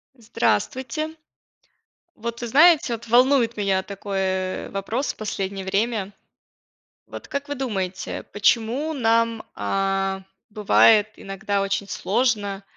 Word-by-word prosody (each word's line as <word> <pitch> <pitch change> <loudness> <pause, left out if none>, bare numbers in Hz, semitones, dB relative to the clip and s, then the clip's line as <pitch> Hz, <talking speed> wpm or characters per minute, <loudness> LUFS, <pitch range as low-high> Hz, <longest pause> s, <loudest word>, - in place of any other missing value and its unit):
Здравствуйте. 255 +6 -1 1.0
Вот 235 +2 -6
вы 240 - -3
знаете, 300 +1 +5
вот 235 0 -7
волнует 245 0 +4
меня 195 -2 +1
такой, 200 0 -6
э, 185 -1 -2
вопрос 220 +8 -2
в - - -27
последнее 195 -2 -4
время. 205 0 -1 0.9
Вот - - -9
как 280 +1 -4
вы 285 - -3
думаете, 195 -9 -4
почему 235 +9 +1
нам, 230 -3 +1
а, 195 0 -1 0.3
бывает 210 0 +5
иногда 195 +1 -3
очень 195 0 -2
сложно 205 -2 -1
215 Hz, 115 wpm, -23 LUFS, 195-240 Hz, 1.0 s, знаете